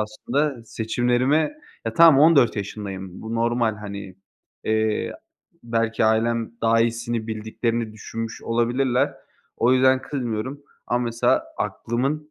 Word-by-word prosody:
aslında 120 +4 -2
seçimlerime 125 - +1 0.3
Ya, - - -2
tamam 165 -5 +7
14 145 -9 +5
yaşındayım, 95 -2 -6
bu 110 +1 -5
normal, 115 -1 +1
hani, 100 -2 -8 0.5
eee, 110 0 0 0.5
belki 115 -1 0
ailem 115 +1 +1
daha 115 0 +4
iyisini 115 -1 -1
bildiklerini 110 +1 -2
düşünmüş 115 +1 -6
olabilirler. 120 +2 +1 0.4
O 120 +2 +3
yüzden 130 0 +4
kızmıyorum 130 +1 -4 0.3
ama 120 0 0
mesela 115 0 +1
aklımın, 140 +6 -2
115 Hz, 110 wpm, -23 LUFS, 110-125 Hz, 0.5 s, tamam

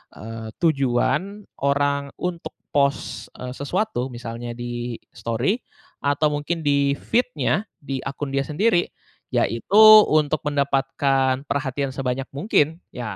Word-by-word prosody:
eee, 110 +1 -7
tujuan 165 +7 +1 0.2
orang 140 0 +1
untuk 180 -2 -4 0.2
post, 140 -1 0
eee, 125 0 -5
sesuatu, 140 - -2
misalnya 120 0 -6
di-story, 120 - -3 0.4
atau 145 +2 +2
mungkin 150 +3 -2
di-feed-nya, 145 - +1
di 135 -2 -5
akun 135 +1 -4
dia 140 - +2
sendiri. 175 +3 +2 0.5
Yaitu 115 - +2 0.3
untuk 155 0 +2
mendapatkan 135 -1 +1
perhatian 140 -1 -2
sebanyak 130 0 -2
mungkin, 160 -1 +1
ya, 120 -5 -5
140 Hz, 105 wpm, -23 LUFS, 125-155 Hz, 0.5 s, atau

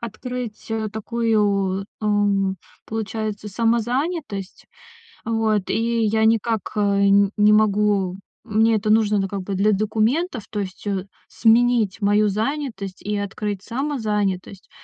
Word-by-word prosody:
открыть, 235 0 -6
э, 220 -1 -1
такую, 205 -4 0 0.2
эм, 200 -2 +1 0.3
получается, 215 -1 -4
самозанятость. 235 - -1 0.6
Вот, 220 -3 0
и 230 +1 0
я 220 +1 +2
никак, 225 -1 +1
э, 210 - 0
н 200 0 +4
не 210 0 +5
могу 205 -3 +2 0.3
мне 225 0 +3
это 215 0 -1
нужно, 215 -1 +3
ну, 195 - 0
как 195 0 -4
бы, 195 - -4
для 205 +3 +2
документов, 220 - 0
то 210 - -4
есть, 190 +2 -7
э, 195 -1 -1 0.2
сменить 230 -3 +3
мою 205 +1 +3
занятость 220 -3 -3
и 210 +1 -2
открыть 200 0 -3
самозанятость. 210 -8 -2
210 Hz, 125 wpm, -22 LUFS, 200-225 Hz, 0.6 s, не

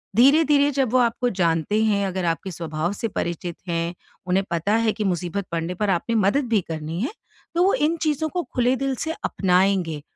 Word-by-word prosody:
धीरे-धीरे 285 +3 +5
जब 265 -4 0
वो 255 - +5
आपको 240 +1 +1
जानते 180 +2 +1
हैं, 200 -2 +2
अगर 185 -1 -2
आपके 170 +3 -2
स्वभाव 165 +1 -3
से 225 +3 -3
परिचित 170 -3 -4
हैं, 170 0 -1 0.3
उन्हें 185 +2 +2
पता 170 +5 0
है 225 -1 +2
कि 215 - -3
मुसीबत 185 0 -2
पड़ने 170 +1 -2
पर 210 +2 -1
आपने 195 +5 0
मदद 220 +7 +2
भी 215 -4 +3
करनी 160 +2 -4
है, 265 - -1 0.4
तो 345 - +4
वो 385 - +4
इन 315 +3 +1
चीज़ों 310 0 0
को 355 +2 -2
खुले 250 +1 +3
दिल 270 0 -1
से 320 - -2
अपनाएँगे 180 -4 +1
200 Hz, 195 wpm, -23 LUFS, 170-255 Hz, 0.4 s, धीरे-धीरे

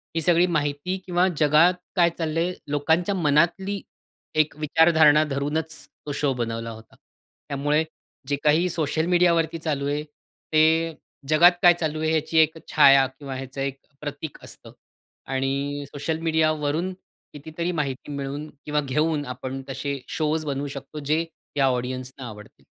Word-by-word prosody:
ही 165 - +1
सगळी 175 +2 +4
माहिती 150 +3 -1
किंवा 180 +1 +2
जगात 155 +4 +5 0.2
काय 175 -2 +5
चाललंय, 165 +2 -1
लोकांच्या 160 +7 +1
मनातली 175 +5 +1 0.5
एक 155 -1 +2
विचारधारणा 155 0 +5
धरूनच 150 +3 -2 0.3
तो 145 - -4
शो 140 -1 0
बनवला 115 -2 -3
होता. 110 0 -13
त्यामुळे 145 +2 -3 0.4
जे 145 - +1
काही 160 +4 +3
सोशल 160 -1 -1
मीडियावरती 170 -2 +2
चालू 145 -4 -2
आहे, 145 +1 -1
ते 160 +2 0 0.3
जगात 170 +3 +7
काय 175 -1 +8
चालू 155 -1 -2
आहे 160 0 +1
याची 160 +1 0
एक 160 0 +4
छाया 135 -1 +7
किंवा 135 0 -8
ह्याचं 135 +1 -6
एक 135 0 -3 0.2
प्रतीक 145 0 -6
असतं. - - -11 0.5
आणि 140 +2 -2
सोशल 150 +3 -3
मीडियावरून 160 +1 0 0.4
कितीतरी 160 +4 -4
माहिती 145 -3 -3
मिळून 140 +2 -5 0.2
किंवा 150 0 0
घेऊन 150 +2 0
आपण 130 +1 -5
तसे 140 +1 -3
शोज 155 0 -1
बनवू 140 0 -2
शकतो, 140 +2 -8
जे 155 +3 0 0.3
या 140 - +4
ऑडियंसना 130 0 -3
आवडतील. 105 -1 -12
150 Hz, 140 wpm, -24 LUFS, 140-160 Hz, 0.5 s, काय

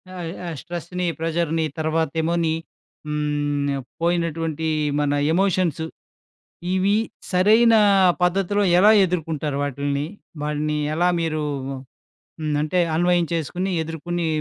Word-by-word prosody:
ఆహ్, 170 -2 -5
ఆ - - -3
స్ట్రెస్‌ని, 175 +1 -4
ప్రెషర్‌ని 165 0 0
తర్వాతేమో, 160 +1 0
నీ 160 - +1 0.5
హ్మ్. 145 -1 -1 0.3
పోయినటువంటి 165 -2 -1 0.3
మన 145 -1 +1 0.2
ఎమోషన్స్. 180 -4 +1 0.9
ఇవి 195 +2 +2 0.3
సరైన 220 +5 +5 0.5
పద్ధతిలో 195 +3 +2 0.2
ఎలా 205 +4 +7
ఎదుర్కుంటారు 160 -5 -2
వాటిల్ని? 140 +1 -2 0.4
వాటిని 150 0 -1 0.2
ఎలా 175 +2 +3
మీరూ 155 -2 -1 0.7
హ్మ్. 155 -2 -5
అంటే, 165 +4 +1 0.2
అన్వయం 175 0 +2
చేసుకొని, 180 +4 -2
ఎదుర్కొని, 165 +2 -3
165 Hz, 100 wpm, -22 LUFS, 150-180 Hz, 0.9 s, ఎలా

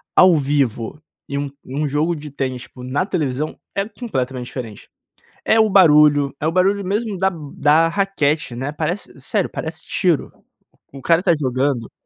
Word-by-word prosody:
ao 185 -2 +7
vivo 140 -3 -1 0.3
e 140 - -3
um 140 0 -2
um 145 +3 -2
jogo 155 +4 0
de 150 -1 -9
tênis, 130 -3 -3
tipo, 125 - -12
na 135 +7 -1
televisão 150 -6 -2 0.2
é 200 +1 -1
completamente 130 - -4
diferente. 115 -6 -8 0.6
É 225 - +4
o 215 -1 +4
barulho 150 -6 +5
é 150 - -1
o 160 - +3
barulho 195 +2 +2
mesmo 205 +1 -2
da 190 +1 +2 0.2
da 150 +3 +4
raquete, 160 -9 0
né, 135 +4 -3
parece 165 +6 -4
sério, - - -1
parece - - -6
tiro. 175 -6 0 0.6
O 135 - -9
cara 170 0 +4
tá 175 - +3
jogando, 130 -3 -1
150 Hz, 165 wpm, -20 LUFS, 135-180 Hz, 0.6 s, ao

